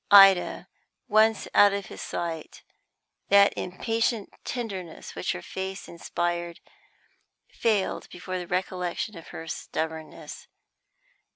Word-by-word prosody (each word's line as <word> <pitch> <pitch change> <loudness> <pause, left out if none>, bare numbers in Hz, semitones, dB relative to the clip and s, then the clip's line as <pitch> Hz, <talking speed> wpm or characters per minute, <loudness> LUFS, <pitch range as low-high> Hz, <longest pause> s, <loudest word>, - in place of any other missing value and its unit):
Ida 195 -2 +7 0.4
once 220 0 +4
out 205 -1 +7
of 200 -1 -2
his - - -9
sight, 165 -2 -4 0.7
that 200 0 +7
impatient 225 +3 -1
tenderness 195 -9 -5
which - - -1
her 90 - -7
face 190 +1 -5
inspired 175 0 -3 0.9
failed 215 -4 0
before 185 +1 -5
the 175 - -6
recollection 180 +3 -2
of 165 - -10
her 165 - -8
stubbornness. 160 0 -5
185 Hz, 105 wpm, -27 LUFS, 170-205 Hz, 0.9 s, Ida